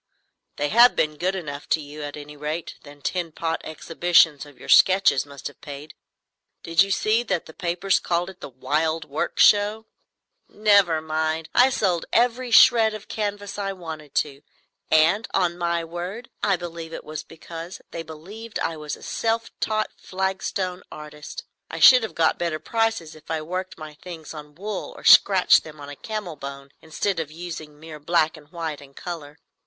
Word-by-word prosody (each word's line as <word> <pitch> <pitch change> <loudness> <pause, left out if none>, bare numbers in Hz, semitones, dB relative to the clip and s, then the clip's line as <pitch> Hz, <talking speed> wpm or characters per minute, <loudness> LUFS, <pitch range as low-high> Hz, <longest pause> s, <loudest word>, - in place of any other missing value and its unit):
"They 145 0 -1
have 235 +4 +6
been 155 -1 +1
good 185 +5 -1
enough 145 -6 -6
to 160 - +3
you, 150 0 -9
at 145 0 -6
any 150 0 -10
rate. 150 +3 -4
That 145 -1 -15
tin 175 -3 -2
pot 165 +1 -2
exhibition 165 -1 +3
of 145 - -16
your - - -11
sketches 185 -8 +5
must 140 -1 -12
have 145 - -7
paid. 145 +1 -9 0.7
Did 165 +1 +3
you 195 - +3
see 215 +4 +2
that 220 -8 -2
the 160 - -12
papers 180 +3 0
called 175 0 -1
it 190 - -21
the - - -7
'Wild 155 +5 -1
Work 145 0 -3
Show'?" 210 +2 +4 0.6
"Never 200 -6 +3
mind. 160 0 -2
I 250 +2 +6
sold 180 -9 0
every 245 +1 +2
shred 225 -1 +6
of 215 - -10
canvas 205 -1 -4
I 195 -1 -2
wanted 160 -5 -9
to; 140 -2 -1 0.5
and, 165 +8 +4
on 180 -3 +2
my 170 -1 -1
word, 175 +8 -6
I 200 -2 +3
believe 170 -2 -7
it - - -6
was 155 0 -6
because 165 +2 -9
they 165 - -5
believed 190 +9 -8
I 165 - -2
was 150 -1 -5
a - - -16
self 230 0 -1
taught 215 0 -1
flagstone 190 -1 -3
artist. 150 0 -9 0.3
I - - -6
should 255 -1 +9
have 220 - -5
got 160 -1 +2
better 170 -2 -1
prices 225 -5 -1
if 155 - -17
I 160 -1 -2
worked 185 +4 -5
my 155 -1 -9
things 165 0 -10
on 150 -1 -10
wool 205 +3 -5
or - - -12
scratched 190 -2 +7
them 155 -1 -12
on 145 0 -8
camel 210 -8 -5
bone 140 0 -8
instead 165 +3 -2
of 160 -3 -3
using 160 -3 -8
mere 155 -1 -10
black 160 +1 +1
and 150 -1 -17
white 165 -4 -5
and 140 -1 -16
colour. 155 -4 -7
165 Hz, 180 wpm, -24 LUFS, 155-195 Hz, 0.7 s, should